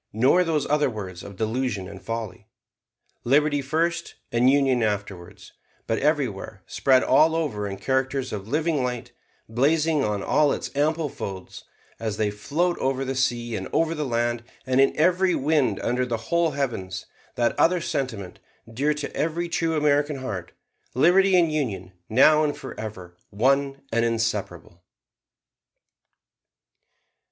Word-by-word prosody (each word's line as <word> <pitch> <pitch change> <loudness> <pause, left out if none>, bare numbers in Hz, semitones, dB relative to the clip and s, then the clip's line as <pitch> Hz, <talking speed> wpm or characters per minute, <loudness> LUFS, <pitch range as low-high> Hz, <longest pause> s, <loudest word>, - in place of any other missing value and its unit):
nor 130 - +4
those 160 -4 0
other 150 -1 +2
words 95 -6 -7
of 100 - -10
delusion 110 -2 -2
and 95 0 -10
folly, 110 -3 -5 0.8
'Liberty 145 +3 +3
first 165 +4 -1 0.2
and 120 +2 +4
Union 135 -3 +3
afterwards'; 105 -5 -4 0.3
but 115 - -1
everywhere, 125 -9 -1
spread 130 -1 +3
all 155 +5 +4
over 125 -11 -2
in 100 -1 -5
characters 130 0 -1
of 100 -1 -5
living 150 +1 0
light, 125 -2 -4 0.4
blazing 150 +5 +2
on 105 -2 -1
all 150 -2 +3
its - - -6
ample 155 +2 +1
folds, 95 -8 -7 0.3
as 110 -3 -3
they 105 -1 0
float 155 +12 -1
over 135 0 -1
the 135 - -2
sea 120 -3 -1
and - - -4
over 165 0 +1
the 155 -2 -3
land, 120 -2 -1 0.2
and 130 0 +3
in 135 - +4
every 180 +3 +3
wind 140 -7 +1
under 125 +1 0
the 120 -2 -2
whole 165 +8 0
heavens, 95 -9 -3 0.3
that 120 -1 +1
other 180 +1 +4
sentiment, 115 - -4 0.3
dear 145 +5 +1
to 145 -1 -6
every 165 +3 -1
true 165 -2 0
American 145 0 +2
heart, 105 -10 -5 0.4
'Liberty 185 +7 +5
and 170 -3 +3
Union, 100 -11 -3 0.2
now 150 +7 +5
and 150 -1 -1
forever, 100 -8 -8
one 135 +5 +1
and 115 +1 +2
inseparable.'" 105 -7 -2
130 Hz, 145 wpm, -24 LUFS, 110-150 Hz, 0.8 s, Liberty